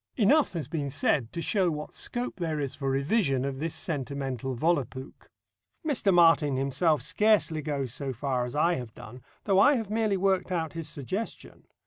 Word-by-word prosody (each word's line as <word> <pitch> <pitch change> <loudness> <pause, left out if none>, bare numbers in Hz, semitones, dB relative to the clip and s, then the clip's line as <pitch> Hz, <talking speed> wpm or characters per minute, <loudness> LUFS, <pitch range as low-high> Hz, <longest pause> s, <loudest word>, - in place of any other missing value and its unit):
Enough 275 +5 +4
has 160 -7 -4
been 145 -2 -3
said 130 -2 0
to 170 - -4
show 190 -4 +2
what 150 -1 -5
scope 245 +1 -3
there 160 -4 -2
is 140 -3 -3
for 135 -2 -3
revision 135 - +1
of 135 -1 -4
this 160 +1 -2
sentimental 135 -4 -3
Volapuk. 135 -3 -2 0.6
Mr. 240 -9 +2
Martin 165 -5 +5
himself 140 +2 +1
scarcely 195 -5 +2
goes 140 -5 -3
so 140 -1 -4
far 130 0 -1
as 125 +2 -5
I 165 +4 +3
have 120 -4 -8
done, 125 +4 -11 0.2
though 195 -2 +3
I 280 +8 +6
have 220 -4 -3
merely 215 -2 +1
worked 190 -1 +1
out 165 -3 -2
his 165 -2 -5
suggestion. 185 - -6
155 Hz, 175 wpm, -28 LUFS, 135-190 Hz, 0.6 s, I